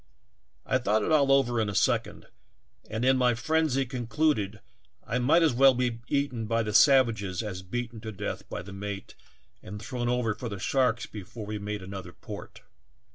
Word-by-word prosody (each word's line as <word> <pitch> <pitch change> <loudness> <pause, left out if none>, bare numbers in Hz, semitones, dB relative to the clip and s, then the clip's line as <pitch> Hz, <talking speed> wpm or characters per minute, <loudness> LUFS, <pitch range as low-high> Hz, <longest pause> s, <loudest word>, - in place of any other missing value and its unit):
I - - +1
thought 105 +1 +1
it - - -1
all 140 -3 +4
over 120 -4 +3
in 105 - -1
a 100 - -4
second, - - 0 0.6
and 110 +3 -2
in 130 0 +4
my 125 -2 +3
frenzy 155 0 +1
concluded 120 -3 -1 0.5
I 125 - -1
might 150 +7 +4
as 160 - +3
well 135 +1 +6
be 120 -2 -1
eaten 140 -6 -1
by 115 +1 +1
the 105 -1 -3
savages 115 - +4
as 95 -4 -5
beaten 115 +4 -5
to 110 - -6
death 105 0 -5
by 85 - -5
the 95 +1 -10
mate 100 0 -6 0.5
and 105 +2 -8
thrown 120 +2 -3
over 125 -3 +1
for 120 +3 -6
the 100 - -5
sharks 125 +2 +1
before 105 +2 -8
we 105 0 -4
made 105 -1 -4
another 95 -2 -8
port. - - -10
115 Hz, 185 wpm, -28 LUFS, 105-130 Hz, 0.6 s, well